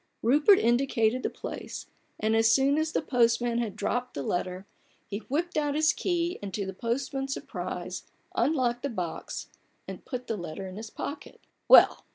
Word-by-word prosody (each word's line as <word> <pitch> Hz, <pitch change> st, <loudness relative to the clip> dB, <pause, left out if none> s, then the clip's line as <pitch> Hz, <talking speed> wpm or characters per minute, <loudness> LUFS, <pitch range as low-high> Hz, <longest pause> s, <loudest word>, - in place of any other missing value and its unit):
*' -, -, -48 dB
Rupert 295 Hz, -, +6 dB
indicated 240 Hz, -1 st, +2 dB
the -, -, -1 dB
place, -, -, -7 dB, 0.3 s
and, 220 Hz, +1 st, +1 dB
as 225 Hz, 0 st, +5 dB
soon 275 Hz, +4 st, +4 dB
as 315 Hz, 0 st, 0 dB
the -, -, 0 dB
postman 235 Hz, -1 st, +2 dB
had 220 Hz, -5 st, -2 dB
dropped 245 Hz, +3 st, -2 dB
the 140 Hz, -, -3 dB
letter, 180 Hz, +4 st, -2 dB, 0.4 s
he 200 Hz, -, -4 dB
whipped 310 Hz, +10 st, -2 dB
out 295 Hz, -1 st, +1 dB
his 305 Hz, 0 st, +4 dB
key, 345 Hz, -1 st, -1 dB
and 200 Hz, -1 st, -5 dB
to 200 Hz, -, -2 dB
the 190 Hz, -, -5 dB
postman's 270 Hz, +5 st, -2 dB
surprise -, -, -5 dB, 0.3 s
unlocked 250 Hz, -5 st, +1 dB
the 280 Hz, -, -2 dB
box 180 Hz, -8 st, -5 dB, 0.4 s
and -, -, -8 dB
put 250 Hz, -2 st, -5 dB
the 225 Hz, -, -2 dB
letter 175 Hz, +2 st, -6 dB
in 185 Hz, -, -8 dB
his 220 Hz, 0 st, -7 dB
pocket. 285 Hz, -, -7 dB, 0.3 s
"Well! -, -, +7 dB
240 Hz, 180 wpm, -28 LUFS, 220-280 Hz, 0.4 s, Well